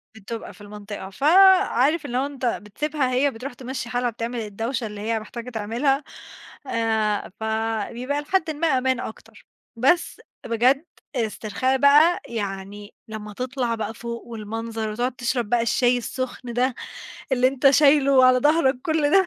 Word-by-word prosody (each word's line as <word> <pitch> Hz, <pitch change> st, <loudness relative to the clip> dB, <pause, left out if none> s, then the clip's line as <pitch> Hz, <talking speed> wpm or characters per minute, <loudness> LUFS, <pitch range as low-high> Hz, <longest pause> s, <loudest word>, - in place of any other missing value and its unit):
بتبقى 220 Hz, +2 st, -7 dB
في -, -, -18 dB
المنطقة، 205 Hz, -1 st, -8 dB
فعارف 335 Hz, -, +4 dB
اللي 250 Hz, -3 st, -2 dB
هو 265 Hz, -, +1 dB
أنت 280 Hz, -3 st, -5 dB
بتسيبها 255 Hz, +5 st, -2 dB
هي 275 Hz, +3 st, +2 dB
بتروح 250 Hz, +2 st, -7 dB
تمشّي 250 Hz, -1 st, -6 dB
حالها، 245 Hz, 0 st, 0 dB
بتعمل 235 Hz, +1 st, -4 dB
الدوشة 225 Hz, +3 st, -3 dB
اللي 210 Hz, -1 st, -8 dB
هي 225 Hz, +1 st, -1 dB
محتاجة 235 Hz, +3 st, -8 dB
تعملها، 245 Hz, +6 st, 0 dB, 0.6 s
آآ 220 Hz, -4 st, 0 dB
فبيبقى 225 Hz, +5 st, -2 dB
لحدٍ 320 Hz, +1 st, 0 dB
ما 310 Hz, +2 st, -1 dB
أمان 260 Hz, -3 st, +1 dB
أكتر، 220 Hz, -, -9 dB, 0.3 s
بس 275 Hz, +10 st, +1 dB, 0.2 s
بجد 250 Hz, +6 st, +2 dB, 0.3 s
استرخاء 235 Hz, +3 st, -1 dB
بقى، 295 Hz, +5 st, +5 dB
يعني 205 Hz, -2 st, -6 dB
لمّا 215 Hz, -1 st, -7 dB
تطلع 250 Hz, 0 st, -2 dB
بقى، 220 Hz, -1 st, -4 dB
فوق 235 Hz, +1 st, -6 dB
والمنظر 225 Hz, 0 st, -5 dB
وتقعد 240 Hz, +3 st, -2 dB
تشرب 240 Hz, -3 st, -2 dB
بقى 240 Hz, 0 st, +2 dB
الشاي 245 Hz, +2 st, +2 dB
السخن 250 Hz, 0 st, -5 dB
ده، 250 Hz, +1 st, +1 dB, 0.6 s
اللي 255 Hz, 0 st, +4 dB
أنت 270 Hz, +1 st, +4 dB
شايله 275 Hz, -2 st, +5 dB
على 255 Hz, 0 st, +6 dB
ضهرك 285 Hz, -2 st, +2 dB
كل 315 Hz, -3 st, +1 dB
ده... 385 Hz, +1 st, +5 dB
245 Hz, 145 wpm, -23 LUFS, 225-275 Hz, 0.6 s, على